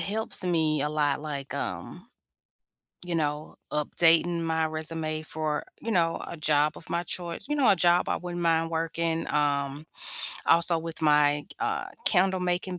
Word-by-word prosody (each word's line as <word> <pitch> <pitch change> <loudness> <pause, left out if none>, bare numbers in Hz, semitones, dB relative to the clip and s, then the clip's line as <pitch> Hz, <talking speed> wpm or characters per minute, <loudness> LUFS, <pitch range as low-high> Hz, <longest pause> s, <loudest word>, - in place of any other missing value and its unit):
helps 215 -1 -2
me 160 -4 +1
a 150 - 0
lot, 150 -2 0
like, 140 -3 -5
um, - - -5 1.0
you 175 -1 -2
know, 150 -1 -2 0.2
updating 165 +3 +3
my 160 -1 0
resume 155 0 -3
for, 155 -1 -2 0.2
you 230 - -3
know, 165 -4 +1
a 170 - -6
job 150 0 +2
of - - -12
my 170 0 -1
choice, 175 -1 -5
you 295 - +1
know, 280 -3 +4
a 200 - +6
job 175 0 +3
I - - +1
wouldn't 175 -1 -5
mind 165 -1 +2
working. 165 0 -1
Um, 145 0 0 0.6
also 170 0 +4
with 165 0 -7
my, 150 -1 +4
uh, - - -1 0.2
candle 190 -1 +3
making 180 0 -2
165 Hz, 160 wpm, -27 LUFS, 150-175 Hz, 1.0 s, a